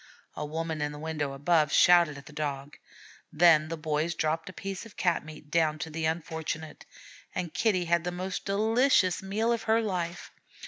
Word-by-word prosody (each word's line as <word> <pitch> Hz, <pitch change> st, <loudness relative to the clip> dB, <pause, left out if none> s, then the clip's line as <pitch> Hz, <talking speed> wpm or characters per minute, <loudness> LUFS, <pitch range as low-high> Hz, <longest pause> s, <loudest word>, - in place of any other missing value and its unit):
A -, -, -4 dB
woman 160 Hz, +1 st, -3 dB
in 150 Hz, 0 st, -2 dB
a -, -, -8 dB
window 150 Hz, -2 st, -3 dB
above 150 Hz, +1 st, +2 dB
shouted 170 Hz, -4 st, +5 dB
at 140 Hz, -, -12 dB
the 150 Hz, -, -13 dB
Dog. 145 Hz, -1 st, -4 dB, 0.5 s
Then 155 Hz, -1 st, +5 dB
the 165 Hz, +1 st, -4 dB
boys 155 Hz, +1 st, -1 dB
dropped 160 Hz, +4 st, -1 dB
a -, -, -7 dB
piece 195 Hz, 0 st, -6 dB
of 225 Hz, -2 st, -14 dB
cat 175 Hz, -2 st, +1 dB
meat 155 Hz, -1 st, -12 dB
down 155 Hz, -2 st, +2 dB
to 160 Hz, +1 st, -6 dB
the 160 Hz, +1 st, -3 dB
unfortunate; 160 Hz, -1 st, -4 dB, 0.5 s
and 175 Hz, -3 st, -3 dB
Kitty 195 Hz, -6 st, +1 dB
had 170 Hz, 0 st, +2 dB
the 180 Hz, -, -2 dB
most 185 Hz, +1 st, -4 dB
delicious 215 Hz, -1 st, +2 dB
meal 210 Hz, +4 st, 0 dB
of 230 Hz, -, -2 dB
her 225 Hz, +1 st, +5 dB
life. 180 Hz, -5 st, -3 dB
165 Hz, 185 wpm, -28 LUFS, 155-185 Hz, 0.5 s, shouted